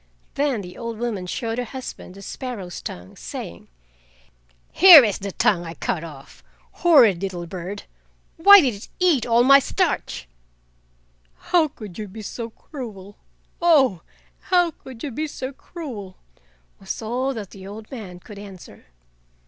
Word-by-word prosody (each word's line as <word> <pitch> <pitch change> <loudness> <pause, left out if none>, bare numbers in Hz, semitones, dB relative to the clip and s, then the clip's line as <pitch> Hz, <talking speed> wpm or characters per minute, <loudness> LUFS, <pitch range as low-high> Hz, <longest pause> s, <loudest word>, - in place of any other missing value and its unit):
Then 275 -6 0
the 180 -1 -10
old 230 -2 -5
woman 215 -6 -3
showed 225 +5 -3
her - - -1
husband 245 -6 -8
the 195 - -11
sparrow's 205 - -6
tongue, 90 +1 -8
saying: 85 0 -8 1.0
"Here 350 -6 +10
is 210 -5 0
the 200 0 -5
tongue 180 -1 +1
I 165 0 -8
cut 160 +2 -2
off! 150 -4 -12 0.4
Horrid 245 - +6
little 180 -3 -4
bird, 185 +3 -7 0.5
why 400 +4 +9
did 260 -6 +1
it 200 - -11
eat 335 -11 +3
all 235 +1 +4
my 275 +2 +8
starch?" 255 - -2 1.1
"How 345 -3 +2
could 215 - -11
you 210 - -5
be 215 +3 -10
so 230 +2 -6
cruel? 215 -6 -10 0.4
Oh! 275 - +4 0.4
how 355 -2 +2
could 260 -6 -13
you 300 +2 -3
so 265 -2 -6
cruel?" 245 - -9 0.6
was 195 - -5
all 255 +4 -2
that 205 -4 -7
the 190 -1 -11
old 215 +2 -10
man 200 -9 -8
could 200 +2 -12
answer. 195 -3 -12
225 Hz, 150 wpm, -23 LUFS, 190-270 Hz, 1.1 s, Here